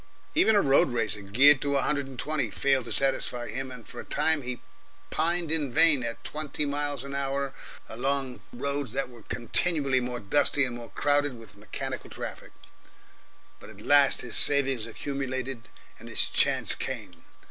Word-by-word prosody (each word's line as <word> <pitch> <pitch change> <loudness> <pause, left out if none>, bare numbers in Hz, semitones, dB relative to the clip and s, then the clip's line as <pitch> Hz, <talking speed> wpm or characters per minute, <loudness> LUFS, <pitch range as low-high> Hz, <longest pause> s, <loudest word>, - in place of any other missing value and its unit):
Even 265 -10 +4
a 205 - +4
road 135 0 +5
racer, 115 -4 -1
geared 130 +9 +5
to 140 -1 +1
a - - +2
hundred 140 -2 0
and 135 -2 -10
twenty, 150 -5 -1
failed 135 +3 +1
to - - -6
satisfy 130 -3 0
him, 130 0 -4
and 125 -3 -11
for - - -9
a - - -6
time 155 0 +1
he 125 -1 -5 0.5
pined 170 0 0
in 150 -5 +3
vain 145 +1 +5
at 115 -1 -5
twenty 150 -1 -2
miles 145 -2 -2
an 140 0 -7
hour 140 0 -2 0.3
along 130 +2 -2
roads 140 -1 -3
that 135 -1 -2
were 120 -2 -14
continually 135 - +1
more 125 -1 -4
dusty 135 +6 +3
and 125 -1 -5
more 120 -1 -9
crowded 145 -3 +1
with 115 -2 -14
mechanical 130 +4 -6
traffic. - - -7 1.1
But - - -13
at - - -13
last 145 -1 +4
his 120 - -3
savings 135 -5 +2
accumulated, 130 0 -4 0.3
and - - -10
his - - +1
chance - - +2
came. 85 -2 -6
135 Hz, 170 wpm, -27 LUFS, 120-145 Hz, 1.1 s, road